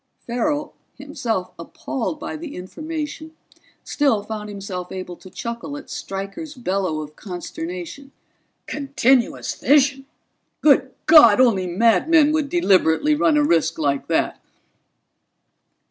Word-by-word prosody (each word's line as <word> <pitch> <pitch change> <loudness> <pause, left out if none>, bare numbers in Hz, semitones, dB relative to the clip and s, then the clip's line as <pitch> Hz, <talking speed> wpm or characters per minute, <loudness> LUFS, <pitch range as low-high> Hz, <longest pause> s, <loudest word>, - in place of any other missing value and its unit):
Farrell, 290 +5 -2 0.2
himself 260 - -4
appalled 260 - -5
by - - -5
the 310 -1 -8
information, 310 - -6 0.5
still 270 -8 +1
found 210 0 -6
himself 195 -3 -6
able 185 -1 -6
to 185 - -14
chuckle 235 +8 -6
at 290 - -11
Stryker's 195 +11 -6
bellow 190 -9 -2
of 150 0 -10
consternation. 180 - -7 0.5
"Continuous 270 -3 +1
fission? 275 -1 +2 0.5
Good 270 -3 +4
God, 300 -9 +8
only 210 -8 +3
madmen 235 - +4
would 305 -2 0
deliberately 205 - +3
run 300 0 +3
a 295 - +4
risk 165 - +1
like 140 -3 -1
that!" - - 0
240 Hz, 115 wpm, -21 LUFS, 185-295 Hz, 0.5 s, God